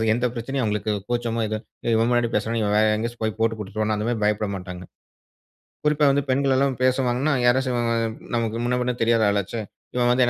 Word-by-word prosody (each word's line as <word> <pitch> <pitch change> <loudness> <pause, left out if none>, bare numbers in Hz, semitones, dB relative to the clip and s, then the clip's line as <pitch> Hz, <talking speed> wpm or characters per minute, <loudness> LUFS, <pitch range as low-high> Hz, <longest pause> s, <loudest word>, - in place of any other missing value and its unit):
அது 110 - +1
எந்த 125 +1 +1
பிரச்சனையும் 130 +3 -2
அவங்களுக்கு 105 0 -1 0.2
கூச்சமோ 120 -1 -1
"ஏதோ 110 0 -2 0.4
இவன் 115 +1 +3
முன்னாடி 120 -1 +2
பேசுறோம் 115 +2 0
இவன் 105 -1 +1
வேறு 110 0 +4
எங்கேயாச்சு 115 +2 -4
போய் 110 -1 0
போட்டு 115 0 +1
குடுத்துருவானோ" 110 +1 -2
அந்த 105 +2 -2
மாரி 120 -2 0
பயப்பட 105 0 +1
மாட்டாங்க. 90 -1 -8 1.0
குறிப்பா 150 0 +3
வந்து 140 0 +1
பெண்கள் 135 +1 +2
எல்லாம் 135 -1 +1
பேசுவாங்கன்னா 130 +2 +2
யாராச்சு 130 +1 +3 0.6
நமக்கு 115 -1 -1
முன்ன 125 0 +1
பின்ன 125 0 0
தெரியாத 115 -1 +3
ஆளாச்சே. 100 +3 -1 0.3
இவன் 120 -1 +2
வந்து 125 +1 +4
எ - - -1
115 Hz, 190 wpm, -23 LUFS, 110-125 Hz, 1.0 s, வேறு